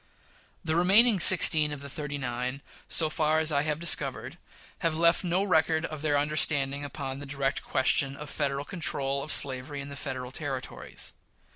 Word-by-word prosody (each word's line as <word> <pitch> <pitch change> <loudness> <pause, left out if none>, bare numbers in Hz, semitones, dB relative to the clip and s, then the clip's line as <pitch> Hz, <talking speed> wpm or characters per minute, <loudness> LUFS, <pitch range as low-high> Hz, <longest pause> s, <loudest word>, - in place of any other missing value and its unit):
The 160 0 0
remaining 200 +5 +5
sixteen 160 -4 +5
of 145 -1 -6
the 140 - -8
"thirty 145 +1 -5
nine," 125 +1 -4 0.2
so 160 - +3
far 155 0 +1
as 160 0 +3
I 140 -1 +2
have 150 0 -1
discovered, 170 - 0 0.4
have 165 -3 -1
left 170 +2 +3
no 180 +2 0
record 160 -3 +1
of 155 -2 -7
their 150 -2 +1
understanding 145 -1 0
upon 140 -2 -6
the 145 - -9
direct 135 -1 -2
question 135 +1 +1
of 150 - -8
Federal 140 -1 -3
control 140 -6 -2
on 150 - -7
slavery 140 0 0
in 140 0 -7
the 140 - -8
Federal 130 -2 -6
Territories. 135 -3 -6
145 Hz, 170 wpm, -27 LUFS, 140-160 Hz, 0.4 s, remaining